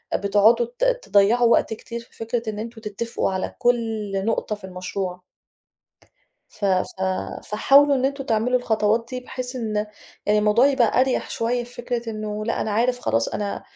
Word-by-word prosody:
بتقعُدوا 210 Hz, +4 st, +4 dB
ت -, -, 0 dB, 0.2 s
تضيّعوا 230 Hz, -, +4 dB
وقت 225 Hz, -, +3 dB
كتير 230 Hz, +2 st, -7 dB
في 235 Hz, -, -16 dB
فكرة 230 Hz, 0 st, -3 dB
إن 210 Hz, -, -5 dB
أنتم 230 Hz, 0 st, -7 dB
تتّفقوا 215 Hz, 0 st, -2 dB
على 190 Hz, 0 st, -3 dB
كل 225 Hz, -5 st, 0 dB
نقطة 220 Hz, -1 st, -1 dB
في 205 Hz, -, -20 dB
المشروع 185 Hz, 0 st, -5 dB, 1.3 s
ف 210 Hz, -, -7 dB
ف 185 Hz, -2 st, +1 dB, 0.6 s
فحاولوا 280 Hz, +7 st, +5 dB
إن 260 Hz, -1 st, 0 dB
أنتم 275 Hz, 0 st, -1 dB
تعملوا 235 Hz, +2 st, +1 dB
الخطوات 225 Hz, -1 st, +1 dB
دي 255 Hz, -1 st, -4 dB
بحيث 250 Hz, 0 st, -6 dB
إن 220 Hz, -3 st, -3 dB
آآ 210 Hz, 0 st, 0 dB, 0.4 s
الموضوع 210 Hz, +4 st, +4 dB
يبقى 255 Hz, -4 st, +3 dB
أريَح 260 Hz, 0 st, 0 dB
شوية 240 Hz, +1 st, -1 dB
في 245 Hz, +1 st, -13 dB
فكرة 240 Hz, -1 st, -3 dB
إنه 215 Hz, -1 st, -4 dB
لا 230 Hz, -, -1 dB
أنا 220 Hz, -, -2 dB
عارف 240 Hz, +4 st, +1 dB
خلاص، 115 Hz, -, +1 dB
أنا 205 Hz, -1 st, -4 dB
225 Hz, 165 wpm, -23 LUFS, 210-245 Hz, 1.3 s, فحاولوا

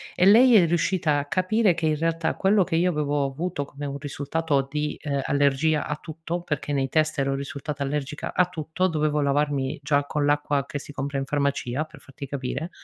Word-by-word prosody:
E 180 Hz, -, +3 dB
lei 235 Hz, +5 st, +7 dB
è 190 Hz, -5 st, +7 dB
riuscita 165 Hz, -2 st, +1 dB
a 140 Hz, -, -3 dB
capire 185 Hz, +5 st, +2 dB
che 165 Hz, -1 st, -3 dB
in 155 Hz, -1 st, +2 dB
realtà 165 Hz, +1 st, 0 dB
quello 200 Hz, 0 st, +3 dB
che 165 Hz, -, -2 dB
io 175 Hz, +2 st, +3 dB
avevo 145 Hz, -2 st, 0 dB
avuto 145 Hz, +3 st, -3 dB
come 145 Hz, +1 st, -8 dB
un 140 Hz, 0 st, -4 dB
risultato 145 Hz, 0 st, -1 dB
di, 150 Hz, +1 st, -2 dB
ehm, 140 Hz, -2 st, -1 dB
allergia 145 Hz, +3 st, +2 dB
a 150 Hz, -, -2 dB
tutto, 165 Hz, +3 st, -5 dB
perché 145 Hz, -3 st, -3 dB
nei 135 Hz, -1 st, 0 dB
test 155 Hz, 0 st, +1 dB
ero 135 Hz, 0 st, +1 dB
risultata 140 Hz, +1 st, -5 dB
allergica 145 Hz, +1 st, -3 dB
a 180 Hz, -, +4 dB
tutto, 165 Hz, +2 st, -1 dB
dovevo 155 Hz, -3 st, 0 dB
lavarmi 140 Hz, 0 st, 0 dB
già 145 Hz, 0 st, +2 dB
con 145 Hz, 0 st, -1 dB
l'acqua 145 Hz, -1 st, +1 dB
che 155 Hz, 0 st, -5 dB
si 145 Hz, -, -10 dB
compra 140 Hz, 0 st, -3 dB
in 135 Hz, -, -3 dB
farmacia 140 Hz, -1 st, -1 dB
per 155 Hz, -, -16 dB
farti 140 Hz, +1 st, -9 dB
capire 135 Hz, +4 st, -4 dB
150 Hz, 200 wpm, -25 LUFS, 140-165 Hz, -, lei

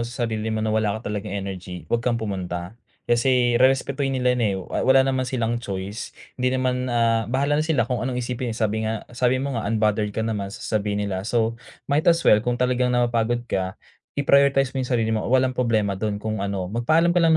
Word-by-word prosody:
sa 120 Hz, +1 st, -3 dB
sarili 110 Hz, -1 st, -2 dB
mo 110 Hz, 0 st, -1 dB
na 110 Hz, -, 0 dB
wala 110 Hz, -1 st, +1 dB
ka 110 Hz, -2 st, -5 dB
talagang 100 Hz, -2 st, -4 dB, 0.2 s
energy, 90 Hz, -2 st, -7 dB
wag 120 Hz, -, +3 dB
kang 120 Hz, 0 st, 0 dB
pumunta. 95 Hz, -5 st, -4 dB, 0.4 s
Kasi 120 Hz, 0 st, +3 dB
rerespetohin 135 Hz, +2 st, +2 dB
nila 125 Hz, -1 st, +2 dB
yun 120 Hz, -, 0 dB
eh 105 Hz, -, +2 dB
wa 95 Hz, -, -4 dB
wala 135 Hz, 0 st, +6 dB
naman 130 Hz, -1 st, 0 dB
silang 120 Hz, -3 st, -1 dB
choice 100 Hz, 0 st, -5 dB, 0.2 s
hindi 125 Hz, 0 st, 0 dB
naman, 130 Hz, -1 st, 0 dB
ah 115 Hz, -1 st, +2 dB
bahala 140 Hz, +4 st, +1 dB
na 155 Hz, -, +1 dB
sila 155 Hz, -7 st, +2 dB
kung 125 Hz, -3 st, -1 dB
anong 125 Hz, -1 st, -2 dB
isipin 125 Hz, 0 st, -3 dB
eh -, -, -7 dB
sabi 110 Hz, -1 st, 0 dB
nga 110 Hz, 0 st, -2 dB, 0.2 s
sabi 125 Hz, +1 st, +2 dB
mo 135 Hz, -1 st, -2 dB
nga 115 Hz, -, -2 dB
unbothered 105 Hz, -1 st, +1 dB
ka -, -, -2 dB
naman 105 Hz, -3 st, -2 dB
sa -, -, -9 dB
sasabihin 105 Hz, -1 st, -1 dB
nila, 95 Hz, -2 st, -2 dB
so 115 Hz, 0 st, +1 dB, 0.4 s
might 145 Hz, +2 st, +2 dB
as 170 Hz, -1 st, +5 dB
well 105 Hz, -, +7 dB
kung 120 Hz, 0 st, 0 dB
talagang 125 Hz, 0 st, +2 dB
napapagod 120 Hz, -1 st, +1 dB
ka 95 Hz, 0 st, -2 dB, 0.4 s
i-prioritize 140 Hz, -1 st, +3 dB
mo 130 Hz, -, 0 dB
yung 125 Hz, -, -8 dB
sarili 115 Hz, -2 st, +1 dB
mo 110 Hz, -, -1 dB
walang 130 Hz, 0 st, +3 dB
problema 110 Hz, -5 st, +1 dB
dun 100 Hz, +1 st, -2 dB
kung 110 Hz, -1 st, -3 dB
ano. 100 Hz, -2 st, -2 dB
Magpaalam 155 Hz, -, +2 dB
ka 175 Hz, -, +3 dB
lang 165 Hz, -, +5 dB
120 Hz, 220 wpm, -23 LUFS, 105-130 Hz, 0.4 s, well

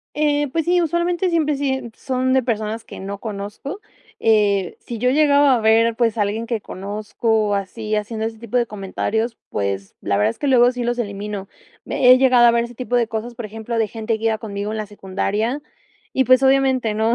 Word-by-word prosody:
Eh, 295 Hz, -1 st, +1 dB
pues 325 Hz, -2 st, -1 dB
sí, 355 Hz, 0 st, +3 dB
usualmente 345 Hz, +2 st, 0 dB
siempre 305 Hz, -3 st, +1 dB
sí, 275 Hz, -1 st, 0 dB
eh, 265 Hz, -3 st, -4 dB
son 260 Hz, 0 st, 0 dB
de 260 Hz, -, +3 dB
personas 220 Hz, -1 st, -2 dB
que -, -, -10 dB
no 195 Hz, +1 st, -5 dB
conozco, 210 Hz, -, -6 dB, 0.4 s
eh, 205 Hz, -4 st, +2 dB
si 235 Hz, -, -7 dB
yo 250 Hz, +3 st, +1 dB
llegaba 285 Hz, -1 st, +4 dB
a 240 Hz, -, +1 dB
ver, 225 Hz, +1 st, +3 dB
pues, 230 Hz, -2 st, +1 dB
a -, -, +3 dB
alguien 210 Hz, +3 st, -2 dB
que 230 Hz, -2 st, -2 dB
conozco, 210 Hz, +2 st, -1 dB
así, 210 Hz, +2 st, -3 dB
haciendo 220 Hz, +1 st, -2 dB
ese 225 Hz, 0 st, -6 dB
tipo 235 Hz, +2 st, -1 dB
de 240 Hz, -, +1 dB
comentarios, 220 Hz, +3 st, -3 dB
pues, 100 Hz, -1 st, -3 dB
la 100 Hz, -, 0 dB
verdad 105 Hz, +1 st, +3 dB
es -, -, -9 dB
que 285 Hz, -, -1 dB
luego 245 Hz, -2 st, +5 dB
sí 250 Hz, -1 st, -4 dB
los 240 Hz, +1 st, -1 dB
elimino. 205 Hz, -2 st, -4 dB, 0.4 s
He 255 Hz, 0 st, +5 dB
llegado 255 Hz, -2 st, +5 dB
a -, -, +7 dB
ver 235 Hz, 0 st, +1 dB
ese 240 Hz, 0 st, -9 dB
tipo 245 Hz, 0 st, -4 dB
de 235 Hz, -2 st, +2 dB
cosas, 230 Hz, +2 st, -4 dB
por 230 Hz, -2 st, -6 dB
ejemplo, 225 Hz, +2 st, -5 dB
de 220 Hz, -1 st, +1 dB
gente 220 Hz, +1 st, -2 dB
que 225 Hz, -, -8 dB
iba 220 Hz, -1 st, +2 dB
conmigo 205 Hz, -2 st, -5 dB
en 220 Hz, -, -3 dB
la 215 Hz, -1 st, -3 dB
secundaria, 205 Hz, +6 st, -2 dB, 0.5 s
y, 265 Hz, -, +2 dB
pues, 255 Hz, +2 st, +5 dB
obviamente, 265 Hz, -4 st, +3 dB
¿no? 220 Hz, +2 st, +2 dB
230 Hz, 215 wpm, -21 LUFS, 210-255 Hz, 0.5 s, a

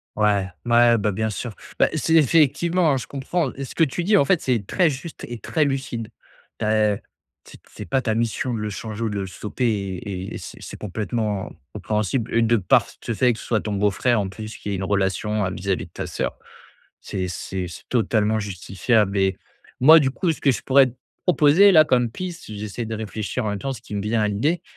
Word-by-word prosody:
Ouais. 105 Hz, -3 st, +2 dB, 0.2 s
Ouais, 120 Hz, 0 st, +5 dB
bah, 105 Hz, 0 st, 0 dB
bien 110 Hz, +3 st, -1 dB
sûr. 110 Hz, +1 st, -5 dB, 0.2 s
Bah, -, -, +5 dB
c'est 160 Hz, -, 0 dB
effectivement, 165 Hz, +3 st, +4 dB
hein, 135 Hz, -, +2 dB
je 125 Hz, -, -6 dB
comprends. 140 Hz, +2 st, -2 dB
Et 140 Hz, -, -6 dB
ce -, -, -9 dB
que 165 Hz, -, +3 dB
tu 160 Hz, +4 st, -1 dB
dis, 205 Hz, +4 st, +3 dB
en 140 Hz, -, +4 dB
fait, 180 Hz, +2 st, +2 dB
c'est 120 Hz, -6 st, 0 dB
très 175 Hz, -, +2 dB
juste 150 Hz, +4 st, -7 dB
et 120 Hz, -1 st, -7 dB
très 155 Hz, +4 st, 0 dB
lucide. 130 Hz, -5 st, -3 dB, 0.5 s
Tu -, -, -1 dB
as, 110 Hz, -1 st, +3 dB
heu -, -, -9 dB, 0.4 s
t -, -, -14 dB
C'est -, -, -9 dB
pas 135 Hz, -1 st, +1 dB
ta 110 Hz, -, 0 dB
mission 115 Hz, +2 st, -1 dB
de 115 Hz, -, -2 dB
le 105 Hz, 0 st, -3 dB
changer 110 Hz, +1 st, -6 dB
ou 115 Hz, -, 0 dB
de 105 Hz, -1 st, -3 dB
le 95 Hz, -, -4 dB
stopper 105 Hz, +7 st, -4 dB
et 100 Hz, -3 st, -3 dB
et -, -, -3 dB
c'est -, -, -10 dB
c'est -, -, -8 dB
complètement 105 Hz, 0 st, -3 dB, 0.2 s
compréhensible. 105 Hz, +3 st, -2 dB
Et 115 Hz, -, +3 dB
de 115 Hz, +1 st, +3 dB
part 90 Hz, -, +3 dB, 0.2 s
ce 120 Hz, -, -2 dB
fait 125 Hz, +2 st, +3 dB
que -, -, -9 dB
ce -, -, -9 dB
soit 110 Hz, -3 st, +1 dB
ton 105 Hz, -1 st, -3 dB
beau-frère, 105 Hz, +4 st, +2 dB
en 100 Hz, -, -2 dB
plus, 110 Hz, +3 st, -8 dB
qui 105 Hz, -, -7 dB
est 100 Hz, -, -1 dB
une 95 Hz, -, -3 dB
relation, 100 Hz, +1 st, 0 dB
heu, 95 Hz, -, -2 dB
vis-à-vis 95 Hz, -1 st, -2 dB
de -, -, -27 dB
ta -, -, -5 dB
sœur, -, -, -3 dB, 0.6 s
c'est 95 Hz, -1 st, -4 dB
c'est 90 Hz, +1 st, -4 dB
c'est 85 Hz, -, -11 dB
totalement 110 Hz, -2 st, +1 dB
justifiable 100 Hz, +1 st, 0 dB
et 95 Hz, -1 st, +2 dB, 0.4 s
moi 155 Hz, +6 st, +9 dB
du 135 Hz, -3 st, +2 dB
coup, 175 Hz, +5 st, -1 dB
ce -, -, -10 dB
que 140 Hz, -, +4 dB
je 120 Hz, -, -2 dB
pourrais 135 Hz, 0 st, +5 dB
te 125 Hz, -, -13 dB, 0.3 s
proposer-là 170 Hz, +1 st, +6 dB
comme 125 Hz, -5 st, +2 dB
piste 180 Hz, +4 st, -6 dB
j'essaie 105 Hz, +3 st, -5 dB
de 110 Hz, -, -4 dB
réfléchir 110 Hz, +2 st, -4 dB
en -, -, -1 dB
même 100 Hz, -, -3 dB
temps. 135 Hz, +6 st, -3 dB
Ce 120 Hz, -, -8 dB
qui 105 Hz, -, -9 dB
me 100 Hz, -, -1 dB
vient 110 Hz, +2 st, 0 dB
à 105 Hz, -, +2 dB
l'idée, 150 Hz, -, 0 dB
110 Hz, 230 wpm, -23 LUFS, 105-135 Hz, 0.6 s, moi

